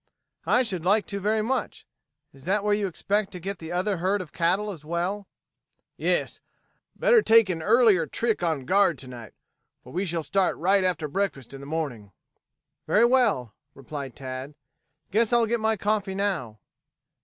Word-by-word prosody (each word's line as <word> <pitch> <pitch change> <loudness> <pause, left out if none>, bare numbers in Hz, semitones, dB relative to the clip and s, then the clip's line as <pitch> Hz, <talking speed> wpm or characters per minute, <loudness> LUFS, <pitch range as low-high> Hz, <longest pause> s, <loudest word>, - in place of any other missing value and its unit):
"I 250 - +4
should 190 -8 -4
like 205 +4 +3
to 200 - -5
very 215 +2 +1
much. 255 +2 -3 0.5
Is 135 +1 -16
that 200 +3 +1
where 210 0 +2
you 205 -1 0
expect 200 +3 -1
to 180 - -6
get 195 +1 -5
the 160 0 -8
other 185 +3 0
herd 190 +4 0
of 180 -5 -8
cattle 190 +5 +1
as 165 -6 -10
well?" 175 +5 -3 0.7
"Yes. - - -1 0.6
Better 475 -3 +4
take 225 - +5
an 165 -3 -2
earlier 210 -4 +4
trick 225 +3 -1
on 160 -6 -1
guard 190 -3 +3
to 130 +1 -8
night, 120 -3 -10 0.5
for 125 - -13
we 185 +4 -1
shall 170 -2 -2
start 190 +5 +1
right 190 +3 +3
after 170 -4 0
breakfast 145 - -3
in 135 - -8
the 140 - -9
morning." 135 - -4 0.7
"Very 225 +3 +4
well," 225 - +2 0.2
replied 135 -1 -7
Tad. 130 +2 -7 0.6
"Guess 220 +3 +2
I'll 235 -1 +4
get 235 +1 0
my 220 0 +1
coffee 205 -1 -1
now." 185 - -2
190 Hz, 175 wpm, -26 LUFS, 155-210 Hz, 0.7 s, take